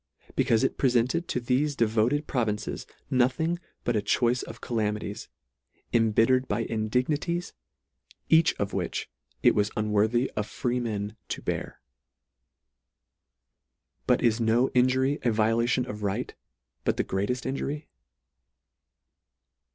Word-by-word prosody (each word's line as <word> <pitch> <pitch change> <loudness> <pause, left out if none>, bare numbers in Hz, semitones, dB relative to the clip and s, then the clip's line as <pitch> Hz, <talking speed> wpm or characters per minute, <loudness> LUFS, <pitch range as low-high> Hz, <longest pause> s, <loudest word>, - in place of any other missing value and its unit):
Becaufe 115 +2 +3
it 135 - 0
prefented 130 +6 +2
to - - -1
thefe 135 +4 0
devoted 115 +6 +2
provinces 110 -5 -2 0.2
nothing 130 +7 +2 0.2
but 120 - 0
a 105 - +2
choice 120 +3 +2
of - - -9
calamities, 105 -3 -3 0.6
imbittered 115 +3 +3
by 105 +3 0
indignities, 130 +11 -1 0.7
each 160 0 +5
of 100 - -3
which - - -3 0.3
it - - +6
was 105 0 +1
unworthy 110 +4 +2
of 105 -1 -2
freemen 110 -3 -2
to - - -4
bear. - - -4 2.3
But - - +3
is 115 -1 +3
no 115 +3 +3
injury 130 +3 +2
a 120 - +2
vi 110 0 +2
olation 120 +2 +1
of 105 -1 -6
right 100 -2 -2 0.5
but - - 0
the - - +2
greatejl 100 +7 -2
injury 140 +3 -3
120 Hz, 120 wpm, -27 LUFS, 110-130 Hz, 2.3 s, it